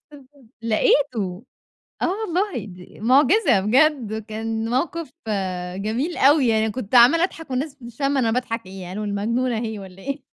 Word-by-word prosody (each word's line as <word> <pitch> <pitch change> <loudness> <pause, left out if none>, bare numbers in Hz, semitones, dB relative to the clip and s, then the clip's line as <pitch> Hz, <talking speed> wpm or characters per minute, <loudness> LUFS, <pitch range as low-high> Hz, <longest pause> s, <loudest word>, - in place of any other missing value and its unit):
بس 290 - -11
ف 270 - -18 0.4
لقيته، 220 -3 +1 0.6
آه - - +2
والله، 395 - -2
دي 180 -1 -13
معجزة، 270 - +4
بجد! 225 -2 +2
كان 225 +1 -3
موقف 300 +4 -2 0.7
جميل 235 - -2
أوي، 280 -1 +5
يعني 220 -1 +2
كنت 250 -1 -4
عمّالة 270 +9 +7
أضحك 325 -5 -4
والناس 275 +2 -3
مش 235 -1 -11
فاهمة 275 0 +1
أنا 230 -3 +1
باضحك 230 -1 -2
ليه. 185 -1 -9
قالوا: 210 +4 -5
"المجنونة 230 +4 -1
أهي 220 -2 -4
والّا 190 0 -12
إيه؟" 275 0 -5
240 Hz, 155 wpm, -22 LUFS, 215-285 Hz, 0.7 s, عمّالة